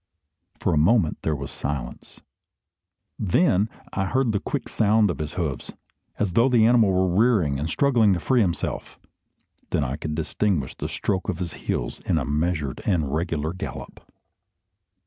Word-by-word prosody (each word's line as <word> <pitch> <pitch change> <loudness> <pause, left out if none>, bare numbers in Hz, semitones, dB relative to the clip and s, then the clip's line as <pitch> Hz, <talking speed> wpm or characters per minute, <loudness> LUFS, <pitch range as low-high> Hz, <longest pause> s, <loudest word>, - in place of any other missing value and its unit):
For 90 - 0
a 75 - +3
moment 85 0 +3
there 80 - 0
was 70 -1 -6
silence. 70 -4 -6 1.0
Then 105 - +2 0.2
I 95 - 0
heard 130 +3 +1
the 100 - 0
quick - - -4
sounds 105 -2 +3
of - - -7
his 75 +1 -4
hoofs, 80 -7 -3 0.4
as 100 -3 0
though 115 +8 +4
the 120 -3 +4
animal 115 -4 +5
were 95 0 +2
rearing 100 - +3
and 75 +3 -2
struggling 120 -1 +3
to 90 - -1
free 125 +6 +2
himself. 85 -5 -2 0.7
Then 75 - +1
I 70 +1 -3
could 75 0 -4
distinguish 80 -1 -1
the - - -4
stroke 95 0 -2
of 90 - -1
his 85 -3 -4
heels - - -3
in - - 0
a 70 - -1
measured 75 -2 -1
and 80 -8 0
regular 80 -1 -1
gallop. 90 - -7
90 Hz, 165 wpm, -24 LUFS, 75-105 Hz, 1.0 s, animal